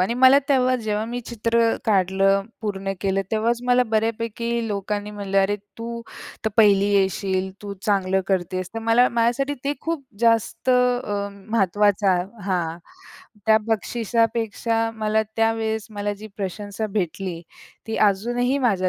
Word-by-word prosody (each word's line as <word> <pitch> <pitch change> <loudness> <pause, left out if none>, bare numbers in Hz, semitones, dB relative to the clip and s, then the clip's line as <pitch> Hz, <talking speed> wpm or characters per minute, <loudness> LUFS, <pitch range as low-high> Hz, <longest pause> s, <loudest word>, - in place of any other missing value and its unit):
आणि 190 +6 +1
मला 260 +2 +7
तेव्हा 255 -2 +3
जेव्हा 215 -2 -2
मी 240 +2 -4
चित्र 230 0 +1
काढलं, 195 -1 +3 0.2
पूर्ण 195 -3 -3
केलं 195 0 +1
तेव्हाच 225 +2 +1
मला 250 0 +4
बऱ्यापैकी 230 +1 -1
लोकांनी 205 0 -3
म्हटलं 200 -1 -1
"अरे! 205 +2 +1 0.2
तू 235 0 -5 0.4
तर - - +3
पहिली 200 -3 +5
येशील, 190 -1 +1
तू 205 -1 -5
चांगलं 190 -2 +1
करतेस." 185 -1 -1
तर 225 - -2
मला 230 +2 +4
माझ्यासाठी 240 +5 +1
ते 285 +1 0
खूप 325 -4 -3 0.2
जास्त 230 +2 +2
अ, 245 -5 +1 0.2
महत्त्वाचं 200 -3 +2
हां. 175 -4 -1 0.7
त्या 220 0 +6
बक्षिसापेक्षा 225 0 0
मला 220 0 +1
त्यावेळेस 225 -1 0
मला 205 0 -2
जी 210 +2 -10
प्रशंसा 205 +2 -4
भेटली 180 -1 -3 0.5
ती 225 - -3
अजूनही 240 +6 +2
माझ्या 200 -8 +2
215 Hz, 135 wpm, -23 LUFS, 195-230 Hz, 0.7 s, मला